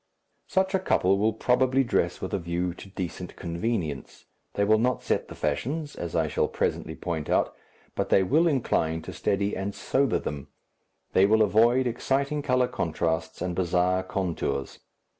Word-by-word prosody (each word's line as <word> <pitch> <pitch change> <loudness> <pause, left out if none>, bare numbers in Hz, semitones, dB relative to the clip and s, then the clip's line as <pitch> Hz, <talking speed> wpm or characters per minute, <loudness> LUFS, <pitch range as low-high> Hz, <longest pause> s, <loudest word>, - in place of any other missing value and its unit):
Such 190 +1 +1
a 190 - +3
couple 95 - +2
will 110 +2 +2
probably 130 +3 +2
dress 120 - 0
with - - -4
a 100 - +1
view 85 +1 -2
to 95 - -12
decent 90 -2 -6
convenience, 85 - -3 0.3
they 100 - +2
will 110 +1 +4
not 125 +2 0
set - - 0
the - - -10
fashions, 150 +3 -2
as 85 -2 -5
I 80 -1 +2
shall - - +1
presently - - -2
point 80 -4 -4
out, - - +2 0.4
but - - -2
they 95 - +5
will 155 - +3
incline 80 - 0
to - - -7
steady 100 +1 0
and 100 +1 -3
sober 135 -3 +1
them, 70 -2 -5 0.7
they 95 +1 +5
will 110 +1 +5
avoid 115 +5 +4
exciting 135 +4 0
colour 125 -3 +2
contrasts 80 -4 -2
and 90 -1 -2
bizarre 90 +1 +2
contours. 90 -8 -3
100 Hz, 165 wpm, -27 LUFS, 85-125 Hz, 0.7 s, they